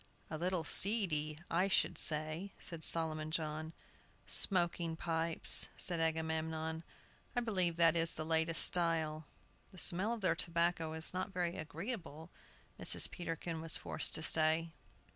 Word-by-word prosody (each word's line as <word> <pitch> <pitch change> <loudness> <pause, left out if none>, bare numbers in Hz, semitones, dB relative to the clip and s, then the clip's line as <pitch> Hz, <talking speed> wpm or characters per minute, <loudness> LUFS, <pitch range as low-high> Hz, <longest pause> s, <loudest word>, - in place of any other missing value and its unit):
"A 155 - -4
little 180 -1 -2
seedy, 155 -5 +3
I 180 +3 +1
should 195 - 0
say," 155 +5 -1
said 165 -2 -8
Solomon 155 -2 0
John. 155 0 -4 0.5
"Smoking 175 -3 +3
pipes," 165 0 +1
said 175 -3 0
Agamemnon; 160 0 -3 0.5
"I 245 - +1
believe 185 -7 0
that 165 -1 +3
is 165 0 0
the 155 - -5
latest 160 0 +1
style." 160 -3 -1 0.4
"The 185 - -16
smell 185 +5 +3
of 235 -2 -5
their 185 - +1
tobacco 170 -1 -1
is 160 +2 -3
not 185 +2 -4
very 175 -2 -3
agreeable," 165 - -7 0.5
Mrs. - - +3
Peterkin 165 -1 -6
was 165 -1 +2
forced - - -2
to 155 - -1
say. 160 +1 +3
165 Hz, 140 wpm, -34 LUFS, 160-175 Hz, 0.5 s, seedy